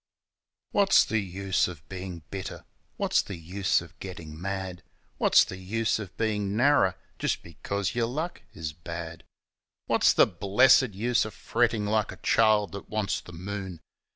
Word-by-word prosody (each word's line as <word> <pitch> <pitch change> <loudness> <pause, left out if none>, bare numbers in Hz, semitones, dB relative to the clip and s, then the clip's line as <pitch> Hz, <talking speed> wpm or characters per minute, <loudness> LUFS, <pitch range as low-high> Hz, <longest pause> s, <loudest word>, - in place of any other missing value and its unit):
What's 200 -1 +5
the 110 - 0
use 95 0 0
of 85 -5 -10
bein' 90 -3 -7
bitter? 95 -2 -6 0.3
What's - - +2
the 100 - -7
use 90 +4 0
of 85 +1 -14
gettin' 85 -4 -8
mad? 95 -2 -4 0.4
What's - - +6
the 90 - -7
use 110 +4 0
of 100 -3 -8
bein' 105 -2 -1
narrer 130 -8 +4 0.2
just - - -1
because 95 +5 -3
yer 120 -1 +1
luck 155 +9 -4
is 80 -4 -5
bad? 85 0 -7 0.6
What's - - +4
the - - +6
blessed 110 +6 +4
use 120 +4 +2
of 110 -3 -7
frettin' 115 +1 +1
like 110 0 +1
a - - -10
child 110 -2 +3
that 100 - -8
wants 110 -2 -1
the - - -12
moon? 95 0 -6
100 Hz, 155 wpm, -27 LUFS, 90-110 Hz, 0.6 s, What's